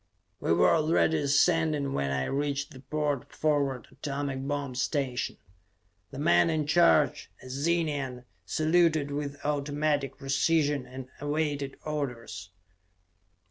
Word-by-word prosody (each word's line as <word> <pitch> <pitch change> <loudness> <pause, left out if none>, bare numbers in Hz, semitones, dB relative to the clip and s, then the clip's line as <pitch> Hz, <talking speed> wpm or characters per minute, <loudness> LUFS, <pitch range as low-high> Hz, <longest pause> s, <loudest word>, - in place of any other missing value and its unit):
We - - -1
were 85 +1 +5
already 160 0 +3
ascending 145 0 +2
when 70 0 -1
I 70 -1 0
reached 145 +1 -2
the 130 - -11
port 145 -1 -2
forward 140 -5 0
atomic 140 -2 -4
bomb 145 -2 -2
station. 125 0 -1 0.7
The - - -9
man 85 - +4
in 155 -2 0
charge, 155 -1 +3
a 130 - -10
Zenian, 140 -4 -1 0.2
saluted 155 -2 +2
with 140 0 -3
automatic 145 -1 0
precision 145 0 +1
and 130 0 -8
awaited 145 -2 -2
orders. 125 -10 -4
145 Hz, 115 wpm, -28 LUFS, 135-155 Hz, 0.7 s, were